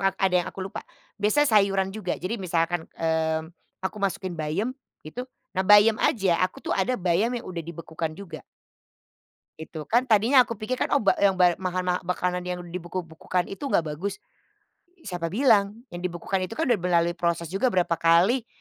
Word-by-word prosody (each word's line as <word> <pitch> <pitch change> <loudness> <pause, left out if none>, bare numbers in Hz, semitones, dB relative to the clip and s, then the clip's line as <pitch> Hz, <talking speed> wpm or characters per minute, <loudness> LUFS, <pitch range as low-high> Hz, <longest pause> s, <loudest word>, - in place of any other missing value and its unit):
ad 190 -1 0
yang 180 -1 +2
aku 190 - -6
lupa. 195 - -6 0.4
Biasa 215 +9 +3
sayuran 195 -5 +3
juga. 200 -4 -3
Jadi 200 +3 -4
misalkan, 170 -1 -1
mmm, 160 0 -1 0.3
aku 190 +3 -2
masukin 190 -1 -2
bayam, 165 +9 -2 0.3
itu. 155 +11 -7 0.3
Nah 190 - -1
bayam 210 +3 +6
aja, 190 -7 +2
aku 185 0 -2
tuh - - -1
ada 250 +7 +1
bayam 185 +5 +1
yang 240 - -6
udah 175 -2 -5
dibekukan 165 -1 -5
juga. 170 -5 -9 1.2
Itu. 160 0 -7
Kan 245 +3 +3
tadinya 240 +3 +5
aku 230 - -4
pikirkan 225 +4 -2
oba 225 -9 +3
yang 200 -1 +4
bay 180 -2 +3
mahan 185 -1 -2
ma 180 0 0
makanan 180 0 -1
yang 180 0 -3
dibeku-bekukan 175 0 -4
itu 195 +9 -6
enggak 160 - +1
bagus. 190 +6 -5 0.8
Siapa 175 -4 -3
bilang, 210 - +2
yang 175 - -6
dibekukan 180 +2 -2
itu 225 - -8
kan 320 - -1
udah 235 -5 +3
melalui 175 -1 +2
proses 170 -1 -1
juga 195 +7 +1
berapa 180 -2 +1
kali, 185 +9 +4
185 Hz, 170 wpm, -25 LUFS, 170-205 Hz, 1.2 s, bayam